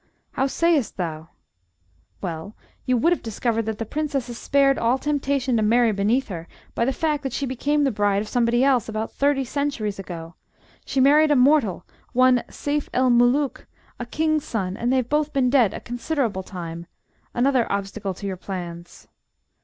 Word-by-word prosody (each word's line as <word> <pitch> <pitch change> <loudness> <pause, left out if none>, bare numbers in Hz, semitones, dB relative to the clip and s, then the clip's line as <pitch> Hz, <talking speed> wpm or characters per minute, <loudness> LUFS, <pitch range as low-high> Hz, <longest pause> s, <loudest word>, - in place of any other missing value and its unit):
"How 270 - 0
sayest 320 -3 +1
thou?" 160 -3 -4 0.9
"Well, 175 +3 -5 0.3
you 255 -1 +3
would 335 +9 +3
have - - -4
discovered 225 0 -2
that 220 -1 -2
the 225 - -3
Princess 280 -1 -2
is 240 - -6
spared 275 -1 +3
all 235 +3 +2
temptation 275 -2 0
to - - +1
marry 230 +2 +4
beneath 215 +6 +1
her 170 -3 -6 0.3
by 235 - 0
the 265 - +1
fact 300 +1 -1
that 270 -4 -4
she 280 - -1
became 285 +3 0
the 275 - +2
bride 205 -1 +1
of - - -10
somebody 240 +2 +2
else 255 -6 +2
about 220 0 -3
thirty 280 -1 +1
centuries 240 -7 -2
ago. 170 -3 -7 0.5
She 270 - -1
married 295 +4 +5
a 295 - +4
mortal, 250 - +3 0.3
one 255 0 +4
Seyf 290 0 -3
el 255 0 +3
Mulook, 245 +4 +2 0.3
a 240 - -5
King's 310 +2 0
son, 190 -5 -3
and 240 +3 -1
they've 260 -2 +1
both 300 +2 0
been 260 -3 +2
dead 250 -7 +4
a - - -6
considerable 240 -4 -2
time 170 -3 -7 0.5
another 255 -1 +2
obstacle 200 -1 -3
to 200 - -8
your 190 -2 -3
plans." 175 -2 -8
245 Hz, 175 wpm, -23 LUFS, 205-275 Hz, 0.9 s, married